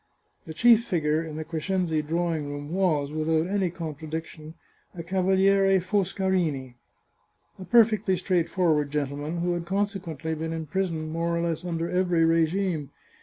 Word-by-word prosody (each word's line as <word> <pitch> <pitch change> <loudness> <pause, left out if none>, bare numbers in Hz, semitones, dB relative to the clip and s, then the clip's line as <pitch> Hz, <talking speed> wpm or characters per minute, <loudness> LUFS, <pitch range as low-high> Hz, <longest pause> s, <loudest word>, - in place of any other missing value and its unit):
The 160 - -6
chief 235 +3 +6
figure 160 -7 0
in 155 -2 -7
the 155 - -4
Crescenzi 165 0 -1
drawing 160 -1 -2
room 145 +1 -6
was, 155 -7 +1
without 155 +1 +1
any 190 -1 0
contradiction, 160 -1 -7 0.4
a 170 - -6
Cavaliere 190 +2 +3
Foscarini, 185 - -1 0.9
a 185 - -7
perfectly 215 -4 +4
straightforward 170 -5 +1
gentleman, 145 +3 -3
who 175 0 0
had 170 -1 -3
consequently 190 -5 -2
been 160 +1 -3
in 160 -1 -4
prison 160 -2 -2
more 170 +1 -1
or - - 0
less 170 0 -2
under 170 -1 -2
every 180 -2 +2
regime. 165 -1 +1
170 Hz, 140 wpm, -26 LUFS, 155-190 Hz, 0.9 s, chief